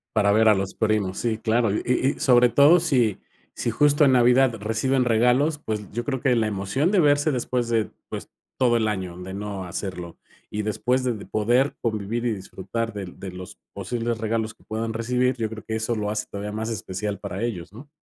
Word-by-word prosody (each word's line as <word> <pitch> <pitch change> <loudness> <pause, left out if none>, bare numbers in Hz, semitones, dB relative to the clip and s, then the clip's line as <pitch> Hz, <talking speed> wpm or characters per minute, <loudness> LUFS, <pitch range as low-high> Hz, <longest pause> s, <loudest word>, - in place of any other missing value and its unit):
Para 100 0 +4
ver 110 +1 +5
a 110 - +7
los 95 0 -3
primos. 105 -4 0
Sí, 115 -2 -1
claro, 115 0 +1
y- - - -1 0.4
y - - -15
sobre 125 -2 +5
todo 145 +8 +6
si 125 - +1 0.3
si 120 - -2
justo 145 +4 +4
en 135 - +5
Navidad 125 0 +4
reciben 120 +5 +1
regalos, 125 +6 +3
pues, 105 -7 -5
yo 120 +3 -4
creo 135 -1 -2
que 125 -2 +2
la 110 - +2
emoción 105 - 0
de 195 - +4
verse 145 0 +3
después 125 -1 -1
de, 115 -2 0 0.2
pues, - - -6 0.3
todo 120 -2 +3
el 110 -2 +1
año 95 -4 -3
de 95 +1 -7
no 100 -1 -5
hacerlo. 90 -1 -5 0.3
Y 105 0 -3
después 125 +5 0
de 125 -2 0
de 105 - -9
poder 120 +6 +1
convivir 110 +1 -2
y 120 - +1
disfrutar 105 +4 -5
del 100 -3 -7
de 95 -2 -7
los 90 +2 -10
posibles 115 +4 -3
regalos 110 0 -2
que - - -27
puedan 110 +1 -3
recibir, 125 +3 0
yo 110 -2 -2
creo 110 -1 -8
que 110 - -4
eso 110 +1 -1
lo 105 -1 -2
hace 105 0 -2
todavía 100 +1 -5
más 110 +2 -3
especial 100 -1 -4
para 100 +1 -5
ellos, 95 -7 -4
¿no? 130 +7 -12
110 Hz, 210 wpm, -24 LUFS, 105-125 Hz, 0.4 s, a